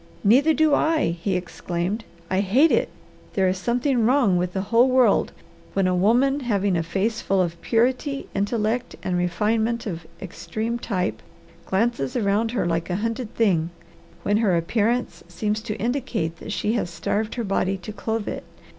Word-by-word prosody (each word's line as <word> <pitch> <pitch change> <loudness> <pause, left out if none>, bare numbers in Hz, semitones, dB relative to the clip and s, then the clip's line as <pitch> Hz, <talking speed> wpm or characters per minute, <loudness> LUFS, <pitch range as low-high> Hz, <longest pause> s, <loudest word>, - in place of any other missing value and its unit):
"Neither 260 +10 +5
do 310 -1 +3
I!" 315 - +2
he 190 +1 0
exclaimed. 180 +4 -3 0.2
"I 190 +2 0
hate 245 - +4
it! - - +2 0.4
There 190 -1 +2
is 185 0 0
something 245 +3 +1
wrong 240 -5 +3
with 180 0 0
the 190 - -1
whole 240 +3 +6
world 255 -1 +3 0.4
when 195 -1 +1
a 185 - +2
woman 245 +10 +3
having 205 -7 0
a 165 - +1
face 200 +7 -1
full 195 0 +1
of 170 -2 -1
purity, 260 +4 0
intellect, 220 +4 -1
and 185 -1 -1
refinement 220 +7 0
of 170 -5 -5
extreme 205 +6 -4
type 185 -6 -2 0.5
glances 190 - 0
around 215 0 +1
her 225 - 0
like 170 0 -1
a 180 - 0
hunted 230 +3 -3
thing; 175 -8 +2 0.5
when 205 +1 +2
her 200 -6 +2
appearance 225 +8 0
seems 210 +5 -2
to 215 -2 -5
indicate 230 - -2
that - - -8
she 210 +1 0
has 225 -7 -1
starved 200 +6 -2
her 240 - -2
body 195 -1 0
to 190 +3 -8
clothe 220 +1 -3
it. - - -4
210 Hz, 170 wpm, -23 LUFS, 185-235 Hz, 0.5 s, whole